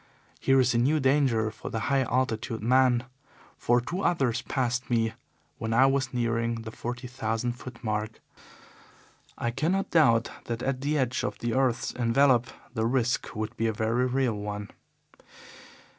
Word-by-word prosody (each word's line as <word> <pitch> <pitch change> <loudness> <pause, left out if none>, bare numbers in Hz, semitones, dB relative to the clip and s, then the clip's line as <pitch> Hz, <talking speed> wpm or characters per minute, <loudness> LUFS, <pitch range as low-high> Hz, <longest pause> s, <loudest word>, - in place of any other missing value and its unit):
Here 135 0 +3
is 125 -1 +3
a 115 - +2
new 145 +6 +3
danger 130 -5 +2
for 110 - -8
the 110 - -3
high 135 +4 +2
altitude 120 -3 -1
man, 125 0 +4 0.5
for 120 +1 +2
two 175 +10 -4
others 135 -11 +1
passed 130 -1 -2
me 115 -2 +1 0.5
when 110 0 -1
I 130 +3 +6
was 135 -2 +1
nearing 115 -2 -1
the 110 - -7
forty 120 +2 -5
thousand 120 -1 -2
foot 120 0 -10
mark. 110 0 -2 1.2
I 120 - -1
cannot 165 +10 -1
doubt 115 -9 +4
that 120 0 -4
at 135 -1 -1
the 150 +2 0
edge 130 -2 0
of - - -3
the 120 -1 -2
earth's 130 -3 +1
envelope 125 0 +3 0.3
the 110 -2 0
risk 125 0 0
would 110 0 -4
be 115 - 0
a 110 - 0
very 115 +4 +1
real 130 -2 +1
one. 105 0 -5
120 Hz, 160 wpm, -27 LUFS, 115-130 Hz, 1.2 s, I